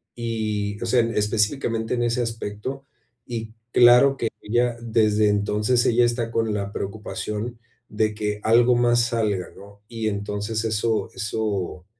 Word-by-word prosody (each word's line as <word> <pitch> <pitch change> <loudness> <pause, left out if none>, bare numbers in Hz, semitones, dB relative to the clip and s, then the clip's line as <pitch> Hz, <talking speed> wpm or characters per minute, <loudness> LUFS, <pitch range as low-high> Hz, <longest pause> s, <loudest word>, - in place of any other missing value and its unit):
y, 110 -3 -2
o - - -2
sea, 125 - +3
específicamente 110 +1 0
en 120 - 0
ese 120 +1 0
aspecto, 115 +4 -5 0.4
y 115 -2 -6 0.2
claro 125 +3 +6
que 115 - -1
ella 120 +2 +1
desde 110 -2 +2
entonces 105 +4 +1
ella 120 +1 +4
está 120 -1 0
con 115 -2 0
la 100 -1 -3
preocupación 105 +3 -5 0.3
de 110 0 -1
que 105 -1 -2
algo 120 +2 +5
más 120 0 +3
salga, 105 -6 -1
¿no? 100 +1 -15
Y 115 -2 -3
entonces 105 +2 -3
eso 110 -1 0
eso 100 -3 -3
110 Hz, 140 wpm, -23 LUFS, 105-120 Hz, 0.4 s, claro